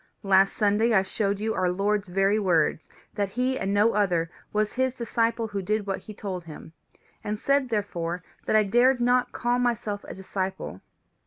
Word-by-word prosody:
Last 195 0 +4
Sunday 215 +3 +2
I 190 - +5
showed 200 +1 -1
you 220 +1 -1
our 185 -1 +1
Lord's 200 +2 0
very 195 +3 +2
words 165 -5 +1 0.2
that 205 -2 -1
he, 255 +5 -1
and 195 - -1
no 210 +3 +3
other, 175 -5 +1 0.2
was 210 0 0
his 260 0 0
disciple 230 -2 -1
who 200 -1 -3
did 215 +2 -1
what 195 -1 -2
he - - -11
told 190 -4 -5
him, 160 0 -11 0.5
and 210 +1 -2
said 275 +2 +1
therefore 180 -5 -2 0.2
that - - +2
I 215 - +6
dared 245 +5 +3
not 245 +1 +2
call 245 0 0
myself 220 -4 -1
a - - -7
disciple. 190 - -4
205 Hz, 180 wpm, -26 LUFS, 190-230 Hz, 0.5 s, I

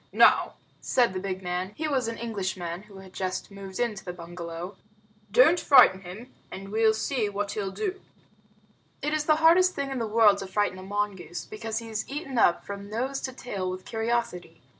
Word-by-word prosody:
"Now," - - +5 0.2
said 240 -6 +2
the 185 - -2
big 190 0 -4
man 180 +2 -3
(he 315 - -2
was 265 -5 0
an 230 0 -4
Englishman 190 -6 -4
who 200 -2 -13
had 190 -1 -13
just 185 +1 -3
moved 195 -1 -8
into 230 -5 -1
the 180 - -5
bungalow), 170 +1 -7 0.6
"don't 315 - +6
frighten 195 - +6
him, 195 +8 -10 0.2
and 195 +1 -8
we'll 220 +1 +3
see 220 -1 -1
what 200 0 -3
he'll 200 -2 -2
do." 380 - -4 1.0
It 300 - 0
is 305 -1 0
the 310 - +5
hardest 340 +4 +5
thing 280 -1 -3
in 265 - -2
the 230 - -1
world 210 -2 +5
to 195 - -5
frighten 190 -1 0
a - - -9
mongoose, 195 -4 -3
because 220 +1 -5
he 230 - -5
is 220 -1 -4
eaten 275 -3 -3
up 175 - +3
from 200 0 -7
nose 260 +5 -2
to 260 - -4
tail 200 -7 -4
with 185 0 -6
curiosity. 225 - -2
205 Hz, 195 wpm, -27 LUFS, 190-245 Hz, 1.0 s, don't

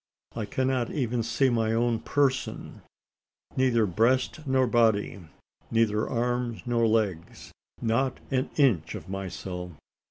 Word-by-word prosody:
I 110 - -2
cannot 130 +1 0
even 125 -4 -1
see 120 +4 +1
my 115 -1 +1
own 115 0 +1
person 135 0 -1 0.7
neither 125 -4 +3
breast 125 - +1
nor 130 -1 +3
body 110 -4 +2 0.5
neither 110 -2 +1
arms 120 -1 -1
nor 120 -2 +2
legs 105 -7 -1 0.3
not 120 +3 0
an 130 0 0
inch 125 - +2
of - - -8
myself. 90 -2 -5
115 Hz, 120 wpm, -27 LUFS, 110-130 Hz, 0.7 s, neither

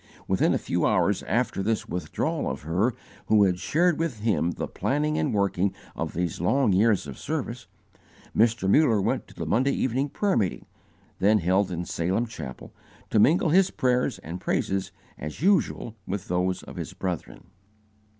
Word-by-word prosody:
Within - - +2
a - - +3
few - - -2
hours - - +2
after - - 0
this 110 +2 -1
withdrawal 85 -3 -2
of - - -5
her 95 +10 +1 0.3
who 105 -1 +5
had 90 -2 +2
shared 170 - +2
with 150 -10 -2
him 100 -6 +1
the - - -3
planning 150 +2 -1
and 150 - 0
working 100 -2 +1 0.2
of - - -3
these 85 -1 -2
long 120 +4 +3
years 105 0 +3
of 70 -2 -8
service, 125 - -4 0.7
Mr. 115 -2 +3
Muller 115 0 +4
went 95 - -1
to - - -17
the - - -4
Monday 130 +6 +2
evening 130 +3 0
prayer 200 +6 0
meeting, 95 -5 -1 0.5
then 105 +3 +4
held 95 +2 +2
in 90 -1 -3
Salem 95 +9 -1
Chapel, 80 - -9 0.4
to 110 - +3
mingle 160 - +4
his 185 +4 +4
prayers 125 -1 +1
and 85 +3 -8
praises 95 0 -1 0.3
as 75 - -6
usual 185 - +1
with 100 +1 -4
those 90 +1 0
of - - -10
his - - -5
brethren. 90 -3 -5
105 Hz, 170 wpm, -26 LUFS, 90-130 Hz, 0.7 s, who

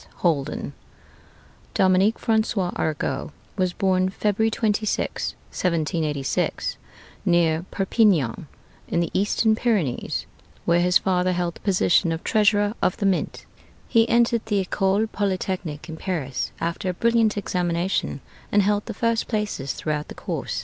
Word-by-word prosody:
HOLDEN 150 -4 0 1.0
Dominique 190 +4 +4
François 220 -5 +1
Arago 150 -3 -2 0.2
was 185 -2 +1
born 185 0 +1
February 210 +3 +1
26th, 215 -1 -1 0.2
1786, 155 -5 -1 0.5
near 170 -1 +2
Perpignan, 190 - +2 0.4
in 170 - 0
the 170 - -1
Eastern 215 +3 +2
Pyrenees, 210 - -1 0.4
where 170 0 +3
his 180 +1 +5
father 185 -1 +1
held 175 -1 -1
the - - -14
position 180 -3 +2
of 165 0 -3
Treasurer 205 -1 +3
of 180 - +1
the 200 - -1
Mint. 190 -2 0 0.4
He 230 -1 +3
entered 235 -1 +3
the 200 -3 +1
École 195 +3 +1
Polytechnique 185 -6 -2
in 160 -1 -7
Paris 155 -8 -3
after 170 +3 -2
a - - -1
brilliant 230 0 +2
examination, 180 -5 -1 0.3
and 205 0 +4
held 205 +1 +1
the - - -5
first 230 0 0
places 210 - -2
throughout 150 -1 -3
the - - -9
course. - - -4
185 Hz, 130 wpm, -24 LUFS, 170-210 Hz, 1.0 s, his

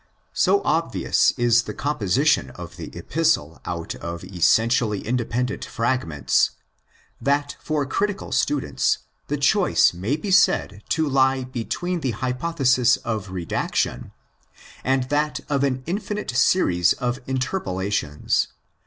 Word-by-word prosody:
So 400 0 +3
obvious - - +2
is 120 -1 +4
the - - -5
composition 140 +1 +1
of - - -9
the - - -7
Epistle 150 - 0
out - - -4
of 85 0 -7
essentially 110 +3 +2
independent 125 +2 -1
fragments 115 - +1 0.7
that 145 +1 0
for 150 -2 -1
critical 200 +8 -2
students 145 -2 +1 0.3
the - - -1
choice - - +3
may 95 +11 -1
be 195 +6 -4
said 100 - +3
to 160 -1 +1
lie 130 -1 +2
between 130 +9 -3
the 130 -8 -2
hypothesis 130 -1 +2
of 110 -4 -4
redaction 90 -3 -2 0.7
and 130 0 +2
that 150 +1 0
of 140 -1 +1
an 130 -2 0
infinite 205 - -3
series 90 - +3
of 125 0 -2
interpolations. 100 - -1
130 Hz, 120 wpm, -23 LUFS, 110-145 Hz, 0.7 s, is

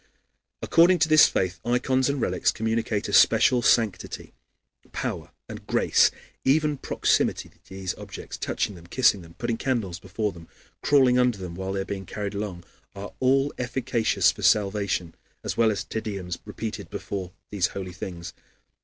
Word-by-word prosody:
According 175 +3 +5
to 160 - +2
this 155 0 +7
faith 95 +1 -1
ikons 130 +2 +1
and 140 0 -1
relics 90 -6 +1
communicate 110 -1 -1
a - - -5
special 125 -1 +5
sanctity, 110 -6 0 0.6
power, - - -4 0.2
and - - -10
grace, - - +4
and - - -21 0.2
even 150 +1 +2
proximity - - 0
to - - -29
these 95 -1 -4
objects, - - -8
touching - - -2
them, 85 -2 -13
kissing 110 -2 +3
them, 85 -1 -15
putting 120 -1 -2
candles 115 -9 -2
before 105 0 -3
them, 85 -3 -13 0.3
crawling 130 -3 +4
under 125 -3 +2
them 90 -3 -7
while 95 +2 -4
they 100 - -1
are - - -4
being 95 -2 -6
carried 105 -1 -4
along, 100 -4 -5 0.3
are 100 +1 -8
all 135 +2 +2
efficacious 115 -6 +1
for 105 - -11
salvation, 100 -3 +1 0.3
as - - -3
well 115 -1 +4
as 100 -2 -2
Te 110 - -4
Deums 95 -5 -5
repeated - - -6
before 95 -3 -5 0.2
these 95 -4 +1
holy 95 -2 -5
things. 90 -1 -7
105 Hz, 165 wpm, -25 LUFS, 95-125 Hz, 0.6 s, this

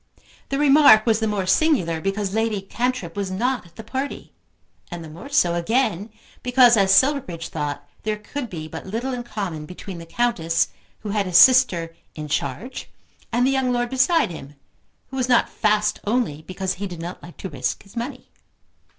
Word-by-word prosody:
The 275 - -1
remark 280 -6 +6
was 225 -2 +3
the 220 - 0
more 205 -3 -1
singular 185 - +2
because 195 +1 -2
Lady 220 -1 0
Cantrip 215 -3 -3
was 200 -2 -2
not 245 +3 -1
at 170 - -23
the 220 - -9
party, 265 +5 -5 0.6
and 175 -1 -7
the 160 - -9
more 170 - -10
so 180 -12 +3
again 205 +2 0 0.3
because, 250 -1 +5
as 195 -3 +3
Silverbridge 195 - +2
thought, 145 -2 -4
there 215 0 -2
could 245 +4 -6
be 155 -4 -6
but 160 +3 -8
little 235 +6 -3
in 245 - -3
common 195 -10 -5
between 180 +1 -8
the 165 - -10
Countess 170 -7 0 0.3
who 215 - -6
had 200 -1 0
his 180 -1 +4
sister 180 -9 +5 0.2
in 150 -1 -6
charge 160 - -3 0.4
and 240 +2 +2
the 265 - +3
young 265 -2 +1
lord 245 0 -1
beside 265 - +3
him, 145 -3 -10 0.6
who 265 - -5
was 255 -1 0
not 245 - +4
fast 210 -1 +1
only 210 -9 -1
because 185 +3 -3
he 200 - -2
did 175 -3 -8
not 175 +2 -7
like 175 - -13
to 190 - -6
risk 130 -5 -3
his 200 +2 -19
money. 250 +2 -6
210 Hz, 185 wpm, -22 LUFS, 170-250 Hz, 0.6 s, remark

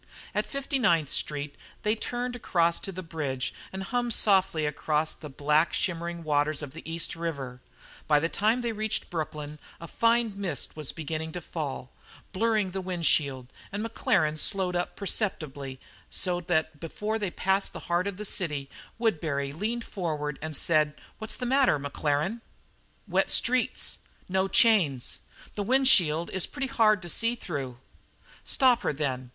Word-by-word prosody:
At - - 0
Fifty 275 0 -2
Ninth 170 - +3
Street 145 -1 -2 0.3
they 210 - +3
turned 245 +2 -3
across 170 -7 +2
to 195 - -5
the 185 0 -6
bridge 145 -6 -3 0.2
and 190 0 -4
hummed 240 +2 0
softly 190 -6 +3
across 150 +1 0
the 150 - -9
black, 150 +4 +2
shimmering 170 -2 -2
waters 150 0 +1
of 140 -2 -7
the 160 - -8
East 165 0 -2
River; 140 -7 -4 0.5
by 150 -1 +5
the 165 - +1
time 220 +7 +2
they 235 -1 0
reached 215 0 -2
Brooklyn 150 -2 -4 0.2
a 170 - -8
fine 230 +2 +2
mist 195 -3 -3
was 155 -3 -2
beginning 160 0 -4
to 180 - -3
fall, 150 -6 -5 0.4
blurring 215 -1 +1
the 190 +1 -3
wind 180 -2 -3
shield, 135 -5 +2 0.2
and 205 +2 -3
Maclaren 195 - +1
slowed 185 +2 0
up 175 0 -1
perceptibly, 145 - -2 0.3
so 180 -2 0
that 160 -3 0
before 210 +7 -3
they 205 -3 -1
passed 190 +3 +1
the - - -8
heart 175 +3 0
of 200 -2 -4
the 210 - -5
city, 150 -8 -1 0.3
Woodbury 150 -11 0
leaned 225 +8 -2
forward 150 -8 -3
and 155 0 -4
said: 155 -2 +2 0.2
"What's 220 0 -3
the 250 - -3
matter, 260 - +4
Maclaren?" 145 +8 -1 0.7
"Wet - - +2
streets 255 +1 +2 0.3
no 190 +1 +1
chains 185 - +3 0.3
this 205 - -2
wind 265 +5 +3
shield 170 -8 +5
is 190 - 0
pretty 275 -2 -3
hard 215 -4 +4
to - - -6
see 230 +6 +1
through." 140 - -5 0.7
"Stop 250 -3 +4
her, - - 0
then. 130 -4 -2
170 Hz, 160 wpm, -28 LUFS, 150-215 Hz, 0.7 s, by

